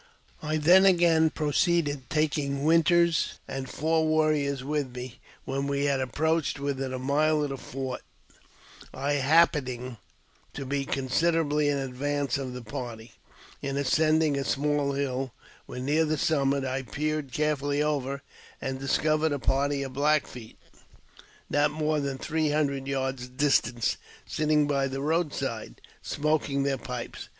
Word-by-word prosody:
I 155 0 -1
then 175 +5 +6
again 170 -4 +5
proceeded^ 150 -2 0
taking 145 -2 0
Winters 165 +1 +3
and 135 -1 -5
four 160 +1 +1
warriors 155 -4 +1
with 140 -3 -2
me. 125 -1 -7 0.3
When 135 +1 -2
we 140 0 0
had 140 -2 +1
ap 130 -2 -4
proached 160 -1 +1
within 135 -2 -3
a 130 - -3
mile 150 +4 +2
of 145 - -2
the 135 - -4
fort, 130 0 -5 0.9
I 140 +2 -1
happening 130 -5 +2 0.6
to 140 - -5
be 140 +1 -1
consider 160 +6 +1
ably 150 -1 +1
in 145 - +1
advance 140 +1 -2
of 130 -2 -4
the 125 -1 -7
party, 115 0 -7 0.5
in 140 0 -3
ascending 155 +2 +2
a - - -1
small 145 0 0
hill, 135 -2 -2 0.3
when 125 +1 -6
near 155 +3 +3
the 155 0 0
summit, 140 -3 +1
I 130 +1 -2
peered 150 +1 -3
carefully 145 0 0
over, 140 -2 -2 0.4
and 130 0 -4
discovered 155 +3 +1
a 145 - 0
party 140 +1 0
of 135 -1 -6
Black 150 +2 +2
Feet, 115 -3 -11 0.9
not 145 +1 +2
more 155 0 0
than 140 -2 -2
three 155 +2 -1
hundred 140 -3 0
yards 135 -2 -2
distant, 125 -4 +1 0.3
sitting 150 +6 +2
by 140 -2 +1
the 135 0 -4
roadside, 155 - -2 0.2
smoking 145 -2 0
their 135 -1 0
pipes. 125 -2 -6
140 Hz, 145 wpm, -27 LUFS, 135-155 Hz, 0.9 s, then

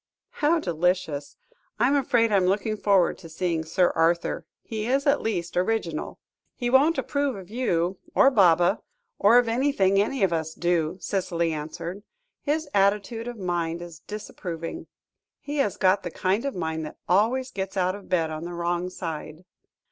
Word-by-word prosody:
"How 320 +3 +2
delicious! 170 - -1 0.4
I 240 - +4
am 280 - +3
afraid 240 -5 +2
I 200 - +4
am 185 -1 +2
looking 210 +3 0
forward 200 -4 +2
to 165 - -11
seeing 165 0 -1
Sir 175 +3 +2
Arthur; 170 +1 +1 0.2
he 220 -1 -4
is 270 +3 +1
at 285 0 +3
least 180 -6 -2
original." 180 -4 -1 0.4
"He 240 -1 -2
won't 290 +6 +5
approve 285 -3 -1
of 190 0 -10
you, 185 -7 0 0.2
or 270 - +6
Baba, 180 -3 +4 0.4
or 210 +4 +6
of 245 -1 +4
anything 225 -6 +2
any 235 +3 -1
of 185 -3 +3
us 160 -1 -2
do," 170 -1 0
Cicely 170 -5 -1
answered; 165 +5 -6 0.4
"his 310 +1 -1
attitude 205 +4 +1
of 240 -1 -6
mind 175 -3 -2
is 170 -3 -10
disapproving. 180 - -6 0.5
He 290 +1 -5
has 205 -8 +1
got 190 +1 +3
the 175 - -4
kind 190 +8 0
of 275 - -2
mind 160 -2 -2
that - - -11
always 235 +8 +2
gets 195 0 -4
out 185 0 +2
of 200 0 -10
bed 165 -3 +1
on 155 +1 -5
the 175 +1 -6
wrong 175 +1 -1
side." 165 -2 -6
190 Hz, 170 wpm, -25 LUFS, 170-230 Hz, 0.5 s, or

